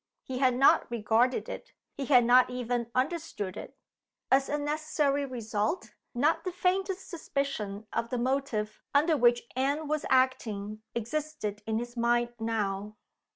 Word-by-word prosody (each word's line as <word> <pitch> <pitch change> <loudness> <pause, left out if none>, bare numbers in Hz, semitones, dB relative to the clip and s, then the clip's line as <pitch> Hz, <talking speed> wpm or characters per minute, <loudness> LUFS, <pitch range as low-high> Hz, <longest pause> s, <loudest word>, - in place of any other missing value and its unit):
He 255 -1 -4
had 255 -2 +3
not 270 +2 +5
regarded 235 +2 +1
it; - - -8 0.2
he 275 - -4
had 250 -3 +5
not 250 +1 +6
even 245 -1 -2
understood 255 - -2
it. - - -9 0.5
As 270 +1 +4
a 295 - 0
necessary 290 -1 0
result, 225 - -2 0.2
not 290 +7 +2
the 365 - -2
faintest 380 +1 -1
suspicion 275 - -3
of 230 0 -1
the 250 - -2
motive 240 -4 -1
under 310 +3 +4
which 240 -3 +4
Anne 285 +4 0
was 305 0 -1
acting 215 -5 +1
existed 235 -3 -3
in 220 0 0
his 240 +1 -5
mind 240 0 +1
now. 210 -2 -2
250 Hz, 145 wpm, -29 LUFS, 225-285 Hz, 0.5 s, not